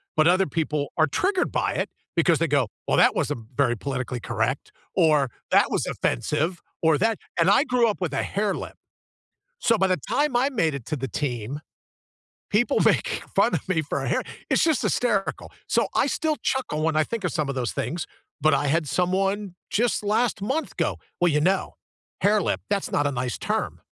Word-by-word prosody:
but 155 - +4
other 185 +3 +4
people 150 -2 -2
are 155 - +4
triggered 370 - 0
by - - 0
it - - -2 0.3
because 170 -1 +3
they 165 - +2
go, 140 -6 +1 0.2
"Well, - - +2
that - - +5
wasn't 115 -2 -2
very 125 -3 +2
politically 130 0 -4
correct," - - -2 0.2
or 150 -5 +4 0.2
"That - - +5
was - - 0
offensive," 150 - -1 0.2
or 160 -2 +4
"That" 225 +3 +1 0.2
and 165 +2 +4
I 230 +8 +5
grew 245 -3 +3
up 210 - -3
with 175 -6 -2
a 135 - 0
hairlip, 205 0 -2 0.8
so 230 - +3
by 195 - +3
the 185 -1 +2
time 290 -2 +1
I 255 +3 +3
made 165 - +1
it 140 -5 -7
to - - -1
the 135 -2 -3
team, 125 -1 -3 0.9
people 240 +7 +2
make - - +2
fun - - +4
of - - -3
me 180 -4 +2
for 155 - -3
a - - -2
hair - - +1 0.3
it's - - +4
just 320 -6 +2
hysterical. 210 -6 0 0.2
So, - - +2
I - - +3
still 315 -2 0
chuckle 250 -13 -1
when 160 0 +1
I 155 - +4
think 230 +5 -4
of 180 - -1
some 155 -4 -1
of 140 - -2
those 125 -3 -1
things, 170 0 -3 0.3
but 155 0 +4
I 145 - +1
had 155 +1 +1
someone 190 +4 0 0.2
just 235 0 +1
last 210 0 +1
month 270 +10 -2
go, - - -1 0.2
"Well, 175 - +4
you 150 0 +2
know, 190 +5 +1 0.5
'hairlip,' 205 0 +2
that's 200 -1 -1
not 145 - +1
a 145 - 0
nice 125 -2 -3
term." - - -2
170 Hz, 200 wpm, -25 LUFS, 145-210 Hz, 0.9 s, that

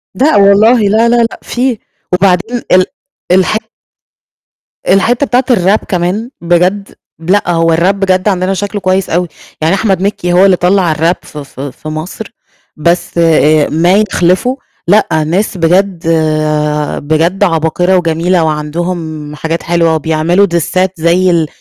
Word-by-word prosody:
لأ 280 +2 +2
والله 205 +4 +5
لا، 220 +3 +2
لا، 240 - +3
لأ، 235 -1 0
فيه. 250 -1 -1 0.4
وبعدين 195 +6 +1
ال 185 0 +5 0.5
الح 190 +3 +2 1.3
الحتّة 235 +8 +2
بتاعة 255 -1 +1
الrap 195 0 +2
كمان 190 +6 -2
بجد. 180 +4 0 0.2
لأ، 175 +2 0
هو 165 -1 +2
الrap 175 +4 +2
بجد، 190 0 0
عندنا 190 -1 0
شكله 205 +2 -4
كويس 185 +1 0
أوي، 175 +2 0 0.3
يعني 160 +4 +2
أحمد 195 -2 0
مكي 195 -3 -1
هو 185 +2 +5
اللي 190 - +4
طلَّع 180 -2 +1
الrap 165 +3 +1
ف 150 - -13
ف 140 -2 -10
في 140 +2 -7
مَصر، 155 +7 -7 0.5
بس 170 +2 -1
آآ 155 -2 +3
ما 170 +4 +2 0.2
يِخلِفه 185 +10 +1 0.3
لأ، 175 -6 +2
ناس 185 +5 -1
بجد 175 0 0 0.9
بجد 165 +6 0
عباقرة 175 +1 +1
وجميلة 170 +1 0
وعندهُم 155 0 -4
حاجات 165 +2 -4
حلوة، 170 -1 +1
وبيعملوا 160 +5 +1
ديسات 185 +2 -1
زَي 175 +3 +2
ال 165 -3 +1
180 Hz, 140 wpm, -11 LUFS, 165-200 Hz, 1.3 s, والله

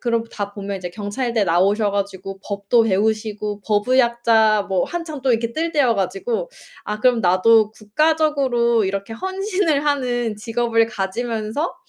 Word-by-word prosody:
그러고 230 -2 0
다 205 -1 -5
보면 200 -1 -5
이제 180 -1 -6
경찰대 220 +3 -2
나오셔 200 +4 +2
가지고 195 -1 -4
법도 200 +3 +1
배우시고 210 0 -1
법의학자 225 -1 +3
뭐 190 -2 +1
한참 330 -5 -6
또 265 - +2
이렇게 230 0 -1
뜰 330 +5 -2
때여 265 -6 +3
가지고 200 - -2 0.4
'아 210 0 -4
그럼 245 -1 +3
나도 210 +4 +4
국가적으로 245 -1 +1
이렇게 200 +3 -3
헌신을 375 - -1
하는 245 -6 -1
직업을 230 +1 +1
가지면서 225 - -3
225 Hz, 330 characters per minute, -20 LUFS, 205-250 Hz, 0.4 s, 나도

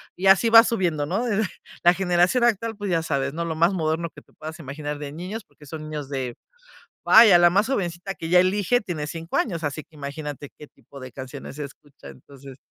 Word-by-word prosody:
y 195 - -1
así 195 +4 +5
va 225 0 +9
subiendo, 175 -11 -1
¿no? 195 +10 -2
de, 220 -2 0 0.4
la 175 0 +6
generación 180 +6 +2
actual, 225 -1 0
pues, 205 -1 -4
ya 165 -2 +1
sabes, 140 -3 -2
¿no?, 170 +2 -3
lo 165 -1 -3
más 170 +4 +3
moderno 165 -1 -1
que - - -15
te - - -29
puedas 155 +1 -8
imaginar 145 +1 -6
de 145 -1 -6
niños 185 +7 -6
porque 150 - -20
son 155 +2 -8
niños 150 -2 -5
de, 130 -3 -4 0.7
vaya 215 -5 +8
la 175 0 +5
más 200 +5 +2
jovencita 195 -6 -3
que 165 - -6
ya 180 +2 +5
elige 205 +6 +2
tiene 160 -7 -4
5 165 +2 -5
años 170 -8 -1
así 145 +1 -3
que 160 - -24
imagínate 145 0 -7
qué - - -11
tipo 140 +1 -16
de 130 0 -9
canciones 130 +2 -9
escucha, 140 - -11
entonces 135 - -14
165 Hz, 210 wpm, -23 LUFS, 145-195 Hz, 0.7 s, va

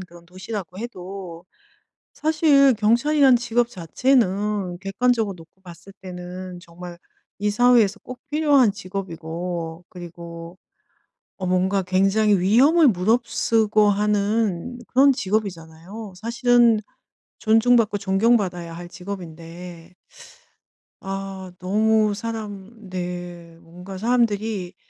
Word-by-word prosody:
그런 175 -2 -13
도시라고 185 0 -7
해도 185 -6 -8 0.7
사실 300 -4 +4
경찰이란 250 +5 +4
직업 240 0 0
자체는 200 - 0
객관적으로 210 +1 0
놓고 170 +3 -18
봤을 180 +1 -13
때는 180 0 -8
정말 175 0 -11 0.4
이 210 +1 0
사회에서 235 -2 +3
꼭 255 0 -9
필요한 290 -6 +4
직업이고 175 -3 -6
그리고 170 -1 -10 0.8
어 185 - -5
뭔가 185 +2 +1
굉장히 195 +3 +2
위험을 270 - +5
무릅쓰고 215 0 +2
하는 210 +1 0
그런 275 +2 +5
직업이잖아요. 195 - -4
사실은 235 +1 +3 0.6
존중받고 225 -1 +3
존경받아야 195 -4 +1
할 175 +1 -8
직업인데. 175 -1 -9 1.1
아. 195 -1 -6
너무 215 +3 +2
사람 215 -1 -7
네. 175 -2 -6
뭔가 180 +3 -10
사람들이 215 -4 0
195 Hz, 240 characters per minute, -22 LUFS, 180-225 Hz, 1.1 s, 위험을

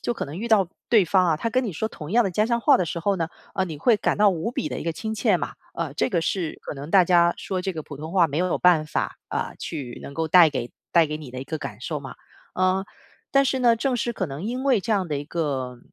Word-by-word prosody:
就 240 - -2
可 - - -3
能 150 +6 -7
遇 235 +2 -4
到 205 -5 +4 0.2
对 220 -5 +5
方 185 +1 +3
啊， 165 -2 +2
他 230 +9 -2
跟 255 +2 +1
你 - - -2
说 180 +6 -2
同 155 -7 -8
样 240 -1 +4
的 195 - 0
家 210 +5 +1
乡 235 0 +1
话 280 -4 +6
的 180 - 0
时 170 - -3
候 200 +4 +1
呢， 165 -2 -2 0.3
呃， 190 - +1
你 160 - -6
会 215 - +3
感 - - 0
到 205 -1 +5
无 175 +5 -2
比 - - -3
地 - - -3
一 - - -5
个 165 - -1
亲 220 +6 -4
切 215 -3 +2
嘛。 - - -4 0.2
呃， 160 -4 -3
这 145 - 0
个 170 -3 0
是 170 -1 -2
可 - - -6
能 145 +2 -8
大 190 -1 +6
家 170 -1 +4
说 185 -2 -3
这 190 -1 -3
个 155 - -4
普 145 -2 -10
通 160 +2 -6
话 180 -2 +4
没 150 +1 -3
有 180 0 +1
办 170 -4 +4
法， - - -3
啊， - - -2
去 135 -7 -6
能 140 - -9
够 160 0 -1
带 170 -1 +7
给 125 -4 -4 0.2
带 165 -2 +5
给 150 +1 -4
你 145 -5 -9
的 130 - -6
一 - - -10
个 160 +3 -4
感 105 -7 -7
受 150 0 -3
嘛。 135 -2 -9 0.4
呃， 185 +1 +1 0.4
但 275 0 +4
是 265 0 0
呢， 240 -2 +4
正 255 +2 0
是 240 0 -2
可 190 - -2
能 140 +1 -6
因 250 +4 -3
为 255 -7 +3
这 220 - -1
样 190 -3 +1
的 145 -2 -1
一 145 - -6
个， 135 -6 -3
175 Hz, 315 characters per minute, -24 LUFS, 155-215 Hz, 0.4 s, 带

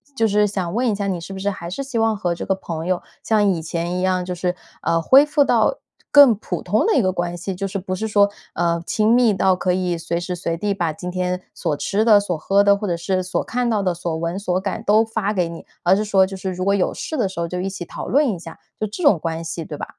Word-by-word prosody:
就 225 - +2
是 210 0 +3
想 190 -4 -3
问 240 +2 +1
一 210 - 0
下， 200 0 -2
你 185 -3 -1
是 175 +4 -8
不 - - -7
是 200 +1 0
还 170 -3 -6
是 275 +10 -4
希 265 -3 -4
望 225 -1 +2
和 180 -4 -1
这 - - -6
个 190 - +1
朋 165 -4 -6
友 185 -1 0 0.2
像 215 -2 +2
以 185 -5 +1
前 170 +2 -3
一 - - -2
样， 185 -1 +1
就 180 0 -4
是， 180 0 -2 0.3
呃， 165 0 +1
恢 270 - +6
复 295 -1 +3
到 - - +2 0.3
更 285 -5 +8
普 180 -4 -5
通 210 +5 +1
的 - - +3
一 - - +4
个 185 -3 +1
关 175 -1 -3
系， 180 +2 -4
就 195 +2 -3
是 195 +1 -4
不 185 0 -4
是 220 +4 -2
说， 205 -1 +4 0.2
呃， 170 0 0
亲 215 +1 +2
密 240 -3 +4
到 190 -1 +3
可 180 0 0
以 180 -1 -1
随 165 0 -3
时 175 +1 -4
随 170 -1 -3
地 205 +3 -1
把 170 -5 -1
今 180 +3 -6
天 180 0 -2
所 150 - -2
吃 205 +9 0
的、 215 -3 +7
所 180 -5 -2
喝 195 +5 +2
的， 200 0 +4
或 205 0 -4
者 175 - 0
是 185 +2 -1
所 185 - -2
看 245 0 -1
到 210 -3 +1
的 180 -2 +1
所 170 -1 -4
闻 170 +4 -3
所 185 -2 -1
感 195 -1 -3
都 215 +2 +5
发 220 -2 -2
给 180 -4 0
你， 170 - -9 0.2
而 175 +2 +5
是 210 +2 -1
说 195 -2 +4
就 190 0 -7
是 190 0 -4
如 185 +1 -4
果 200 +1 +2
有 200 -2 +1
事 315 - -5
的 225 -7 +1
时 185 -2 -7
候 170 - -1
就 180 - -3
一 190 - -2
起 190 -2 -6
讨 - - -7
论 285 +1 +3
一 185 -6 -3
下， 165 -1 -10 0.2
就 215 - -1
这 220 - -6
种 210 - +5
关 165 0 -3
系， 165 0 -5
对 150 - -7
吧？ - - -4
190 Hz, 310 characters per minute, -21 LUFS, 175-210 Hz, 0.3 s, 更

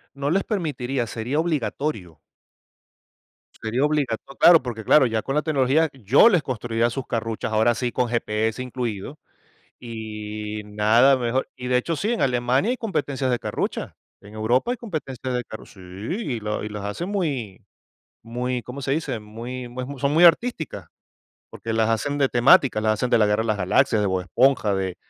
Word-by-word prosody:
No 140 +1 -2
les 195 +3 +2
permitiría, 135 - -2
sería 120 +6 -2
obligatorio. 140 - -2 1.4
Sería 115 +4 -1
obligato 145 -4 -1
Claro, 170 -2 +8
porque 120 -3 -6
claro, 135 +5 +5
ya 110 -2 0
con 135 +5 -3
la 150 - +3
tecnología 150 +1 +2
yo 135 - +5
les 180 -8 +2
construiría 115 -1 -1
sus 130 +2 -5
carruchas, 115 -2 -3
ahora 110 +2 +3
sí 120 +1 -2
con 125 0 0
GPS 110 0 -1
incluido, 125 0 -5 0.6
y 110 -2 -6
nada 110 +6 +4
mejor. 125 +1 -1
Y 125 - -6
de 125 0 +3
hecho, 165 +7 -1
sí, 205 +9 -1
en 240 - -1
Alemania 130 - +1
hay 255 - -2
competencias 145 - -2
de 125 - +1
carrucha, - - -4 0.3
en 100 +1 -14
Europa 120 - +1
hay 250 - -2
competencias 135 - -5
de 125 - -1
carru 110 - -10
sí, 95 - -17
y 110 - -5
la 105 0 -3
y - - -5
las 105 -1 -6
hacen 170 - -4
muy 140 - -3 0.6
muy, 125 +2 -3
¿cómo 130 +3 -8
se 135 - -2
dice? 140 -5 -2
Muy, 115 +4 -7
es - - -9
muy, 130 +3 -6
son 140 +1 +1
muy 165 +3 +5
artísticas, 170 - +2 0.6
porque 115 - -6
las 110 0 +2
hacen 125 +6 -1
de 140 -2 +3
temática, 120 -1 +4
las 110 0 +2
hacen 125 +4 -1
de - - +4
la 105 - +4
guerra 105 +1 +1
de - - -5
las 110 -2 +1
galaxias, 100 +3 +2
de 105 - +1
Bob 95 -1 0
Esponja, 115 +1 +2
de 95 -2 -2
125 Hz, 185 wpm, -23 LUFS, 110-140 Hz, 1.4 s, Claro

